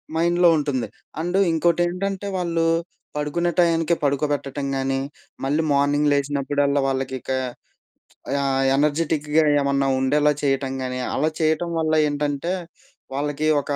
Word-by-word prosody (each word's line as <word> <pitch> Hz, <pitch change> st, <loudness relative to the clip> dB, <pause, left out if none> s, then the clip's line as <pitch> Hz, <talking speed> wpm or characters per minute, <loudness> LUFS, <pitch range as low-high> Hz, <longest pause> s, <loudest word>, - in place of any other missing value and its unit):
మైండ్‌లో 175 Hz, +1 st, +4 dB
ఉంటుంది. 140 Hz, -5 st, -1 dB, 0.3 s
అండ్ 175 Hz, +3 st, -1 dB
ఇంకోటేంటంటే 175 Hz, +4 st, 0 dB
వాళ్ళు, 170 Hz, -2 st, 0 dB, 0.5 s
పడుకునే 150 Hz, +4 st, -1 dB
టయానికి 170 Hz, -1 st, +3 dB
పడుకోబెట్టటం 140 Hz, -1 st, -1 dB
గాని, 135 Hz, 0 st, 0 dB, 0.4 s
మళ్ళీ 145 Hz, +4 st, +1 dB
మార్నింగ్ 145 Hz, +1 st, +2 dB
లేచినప్పుడల్లా 140 Hz, 0 st, +1 dB
వాళ్ళకిక 130 Hz, -1 st, -3 dB, 1.1 s
ఆహ్, 135 Hz, -1 st, +1 dB
ఎనర్జిటిక్‌గా 150 Hz, +1 st, +1 dB, 0.2 s
ఏమన్నా 140 Hz, 0 st, +1 dB
ఉండేలా 145 Hz, +3 st, +3 dB
చేయటం 135 Hz, -1 st, 0 dB
గానీ, 125 Hz, 0 st, -3 dB, 0.2 s
అలా 155 Hz, +3 st, +1 dB
చేయటం 160 Hz, +2 st, +1 dB
వల్ల 160 Hz, -1 st, 0 dB, 0.2 s
ఏంటంటే, 145 Hz, +3 st, -2 dB, 0.6 s
వాళ్ళకి 145 Hz, +2 st, -2 dB, 0.2 s
ఒక -, -, -8 dB
145 Hz, 110 wpm, -23 LUFS, 140-165 Hz, 1.1 s, మైండ్‌లో